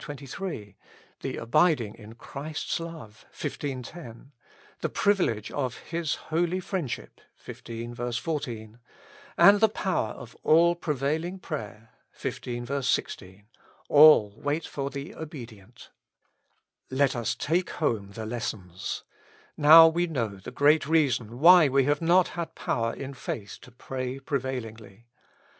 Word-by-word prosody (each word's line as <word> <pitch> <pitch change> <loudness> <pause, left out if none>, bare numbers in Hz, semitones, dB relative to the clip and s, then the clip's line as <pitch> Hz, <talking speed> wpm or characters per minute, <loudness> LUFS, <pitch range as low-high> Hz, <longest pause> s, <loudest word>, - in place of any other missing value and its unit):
23), 140 - -7 0.4
the - - -4
abiding 120 - +2
in 110 +1 -13
Christ's 145 +7 -5
love 160 -11 -9
(xv. 135 -3 -4
10), 135 -5 -11 0.5
the - - -2
privilege 175 - +1
of 130 -4 -3
His 165 -2 -3
holy 170 +3 -1
friendship 160 - -5 0.2
(xv, 120 +1 -5
14), 120 -7 -5 0.6
and 205 +1 +7
the 220 0 +5
power 185 - -1
of 120 - -12
all 170 +2 +5
prevailing 160 +2 -2
prayer 115 - -7 0.3
(xv. 125 +3 -4
16), 100 -6 -2 0.2
— - - -31
all 145 -9 +7
wait 145 +4 -2
for 140 -1 -4
the 140 +8 -7
obedient. 120 - -11 1.0
Let 135 0 +1
us 120 -2 -1
take 170 +4 0
home 110 -10 -2
the 110 +1 -6
lessons. 110 -6 -5 0.5
Now 160 +2 +9
we 170 +2 +1
know 115 -11 -3
the 95 - -9
great 145 +3 +3
reason 130 -8 +1
why 170 +2 +8
we 135 +1 +3
have 145 +5 +1
not 175 +2 +4
had 170 -2 -6
power 115 -1 -1
in 140 0 -7
faith 105 -5 -6
to - - -14
pray 130 +1 -5
prevailingly. 120 -6 -5
135 Hz, 125 wpm, -27 LUFS, 115-160 Hz, 1.0 s, Now